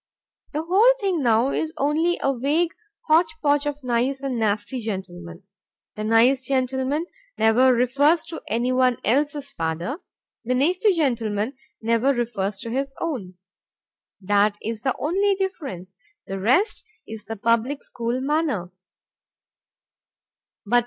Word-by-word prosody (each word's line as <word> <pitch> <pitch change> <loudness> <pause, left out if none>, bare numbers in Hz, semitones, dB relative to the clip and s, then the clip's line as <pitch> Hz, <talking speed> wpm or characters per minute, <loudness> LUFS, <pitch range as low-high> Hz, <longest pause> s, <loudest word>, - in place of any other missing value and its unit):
The 305 +2 -2
whole 405 +9 +5
thing 380 -7 0
now 235 +1 +3
is 320 0 -2
only 315 +5 +1
a 275 0 +1
vague 300 +7 +1 0.3
hotch 315 0 +3
potch 290 -1 +2
of 290 -1 -4
nice 250 +3 0
and 260 -4 -2
nasty 215 +4 -1
gentlemen. 185 -5 -6 0.5
The 215 - -4
nice 235 +4 +4
gentleman 265 +3 0 0.3
never 240 +4 +5
refers 280 +7 +3
to 325 0 -8
anyone 250 +2 +2
else's 285 +3 0
father, 170 - -3 0.4
the 250 +2 0
nasty 360 - +3
gentleman 235 - 0 0.3
never 230 +4 +2
refers 215 -5 -2
to 230 - -5
his 270 +2 -2
own. 230 - -4 0.8
That 205 +1 +2
is 225 -1 -5
the 265 0 0
only 390 +6 +1
difference, 275 - -5 0.3
the 195 0 -5
rest 260 - +2 0.2
is 220 -1 -8
the 225 - -5
public 230 +6 0
school 240 +2 -3
manner. 275 - -1
255 Hz, 125 wpm, -23 LUFS, 220-295 Hz, 0.8 s, whole